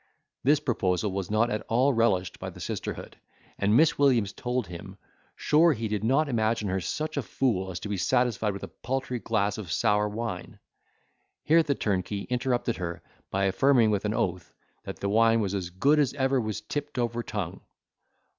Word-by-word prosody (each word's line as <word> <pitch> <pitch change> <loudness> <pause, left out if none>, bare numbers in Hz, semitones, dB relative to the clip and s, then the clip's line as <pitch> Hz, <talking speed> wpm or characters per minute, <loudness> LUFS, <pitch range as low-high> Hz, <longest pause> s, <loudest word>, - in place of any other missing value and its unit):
This 145 +2 +4
proposal 100 - 0
was 95 -1 -3
not 110 +3 +2
at 105 - -1
all 130 +5 +3
relished 110 -6 +1
by - - -5
the - - -12
sisterhood: - - -5 0.4
and 105 +3 +3
Miss 160 -1 +4
Williams 120 -8 +3
told 125 -1 -2
him, 95 +2 -9 0.4
sure 160 +2 +4
he 115 -3 -3
did 105 -1 -2
not 135 +7 +2
imagine 110 -4 0
her 95 0 -1
such 155 - -3
a - - +2
fool 110 -7 -1
as 90 - -5
to - - -5
be 105 -1 -2
satisfied 120 -1 +1
with 100 - -8
a - - -4
paltry 130 -1 -4
glass 105 -2 0
of 95 -6 -7
sour 105 +4 +2
wine? 105 -4 -5 0.9
Here 165 +2 +5
the 145 -3 0
turnkey 100 -1 -1
interrupted 120 -1 0
her 85 -2 -5 0.3
by 100 +1 0
affirming 120 +2 +4
with 100 -2 0
an 105 +1 0
oath, 90 -1 -2 0.3
that - - -6
the 100 - -3
wine 115 +2 +4
was 100 -3 -1
as 95 -3 -3
good 140 +12 +3
as 140 -2 +1
ever 135 -1 +1
was 110 -1 -4
tipped 145 +5 -5
over 120 -1 -1
tongue. 100 -6 -5
110 Hz, 185 wpm, -27 LUFS, 100-130 Hz, 0.9 s, Here